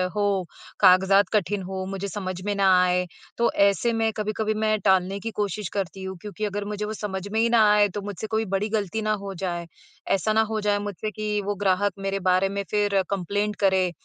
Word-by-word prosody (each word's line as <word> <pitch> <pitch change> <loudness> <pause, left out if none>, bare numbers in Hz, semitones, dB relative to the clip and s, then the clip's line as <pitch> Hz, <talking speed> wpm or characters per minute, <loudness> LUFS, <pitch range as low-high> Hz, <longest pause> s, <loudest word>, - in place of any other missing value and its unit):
हो, 200 -3 +1 0.3
कागज़ात 190 +1 +5
कठिन 205 -1 +1
हों, 190 0 -4
मुझे 195 0 -4
समझ 185 -2 -5
में 205 - 0
ना 195 -1 +3 0.2
आए, 180 0 +1 0.3
तो 235 - +2 0.2
ऐसे 230 +5 0
मैं 225 0 +1
कभी-कभी 215 0 -1
मैं 215 0 +1
टालने 190 0 +3
की 225 +3 -5
कोशिश 205 -1 -2
करती 195 -1 -3
हूँ, 190 0 -5
क्योंकि 210 0 -5
अगर 205 0 -3
मुझे 210 0 -3
वो 215 - -4
समझ 195 -2 -5
में 220 - 0
ही 230 +1 +3
ना 230 -2 +5
आए, 210 0 +5
तो 205 +2 -5
मुझसे 205 +1 -6
कोई 220 0 0
बड़ी 210 +3 -2
ग़लती 215 0 -1
ना 215 0 0
हो 195 -1 -5
जाए। 175 -2 -3 0.5
ऐसा 205 +3 +1
ना 220 - +4
हो 220 - 0
जाए 205 0 +1
मुझसे 205 +1 -4
कि 210 0 -2
वो 205 0 -1
ग्राहक 200 0 +1
मेरे 195 0 -2
बारे 185 +1 +2
में 200 0 -3
फिर 205 -2 +2
कंप्लेंट 205 +2 -1
करे, 190 -2 +2
205 Hz, 215 wpm, -25 LUFS, 190-210 Hz, 0.5 s, कागज़ात